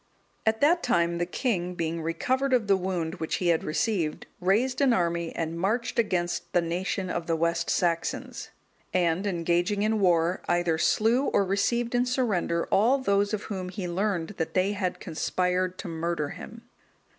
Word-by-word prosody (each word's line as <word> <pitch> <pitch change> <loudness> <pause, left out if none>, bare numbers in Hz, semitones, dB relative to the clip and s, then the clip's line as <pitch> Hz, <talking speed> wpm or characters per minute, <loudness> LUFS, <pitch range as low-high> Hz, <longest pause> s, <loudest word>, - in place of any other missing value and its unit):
(216) 220 - +5
At - - -22
that 335 +4 +4
time, 170 -8 +1
the 175 - 0
king, 180 -5 -1
being 165 0 -2
recovered 260 +12 0
of 240 -4 +3
the 200 -1 +4
wound 180 -2 -3
which 160 - -1
he 180 - 0
had 165 -1 +2
received, 165 -1 -1
raised 220 +9 +1
an 270 -3 +4
army 170 -4 0
and 165 0 -3
marched 230 +6 0
against 175 -6 -1
the 175 - +4
nation 180 +2 -2
of 170 -1 -3
the 165 - +1
West 170 +1 0
Saxons; 170 -2 -1 0.5
and 180 +2 +1
engaging 175 +3 0
in 220 0 +1
war, 175 -2 +2
either 175 -2 +1
slew 230 - +3
or 200 - +2
received 230 +5 0
in 245 +1 +2
surrender 210 -10 0
all 235 +7 +4
those 200 -5 +1
of 210 -1 -2
whom 185 -3 -5
he 185 -1 -5
learned 180 -1 -1
that 165 - -3
they 185 +2 +2
had 190 -3 -2
conspired 180 +2 -1
to - - -6
murder 165 -2 -2
him. 230 +8 -10
185 Hz, 175 wpm, -27 LUFS, 170-215 Hz, 0.5 s, 216